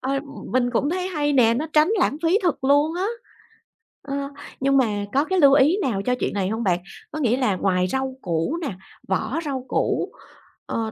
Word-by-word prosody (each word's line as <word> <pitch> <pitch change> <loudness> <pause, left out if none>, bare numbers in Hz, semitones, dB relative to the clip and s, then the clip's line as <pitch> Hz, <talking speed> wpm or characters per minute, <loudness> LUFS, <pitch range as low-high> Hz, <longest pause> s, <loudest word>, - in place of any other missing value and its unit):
Ờ, 275 +1 -1 0.3
mình 245 -1 +2
cũng 285 +6 +1
thấy 365 +1 -1
hay 295 -4 0
nè, 235 -4 +4
nó 300 +6 -2
tránh 305 +2 +5
lãng 300 - +2
phí 335 +5 +3
thật 330 -6 0
luôn 290 +4 +3
á. 370 +3 -1 1.0
Ờ, 275 -1 -5 0.4
nhưng 275 0 +3
mà 210 -5 +1
có 280 +3 +3
cái 375 +2 0
lưu 280 -2 +7
ý 295 +7 +5
nào 210 - 0
cho 250 0 +2
chuyện - - -1
này 195 -2 -1
hông 225 +2 -2
bạn? 180 -4 +2 0.3
Có 310 - -5
nghĩa 250 -3 +2
là 215 -8 +1
ngoài 185 -1 +1
rau 265 +3 -2
củ 170 - -1
nè, 275 - -3 0.3
vỏ 220 - -1
rau 265 -3 -3
củ, - - 0 0.5
ờ, 225 -1 -3
265 Hz, 205 wpm, -23 LUFS, 220-300 Hz, 1.0 s, lưu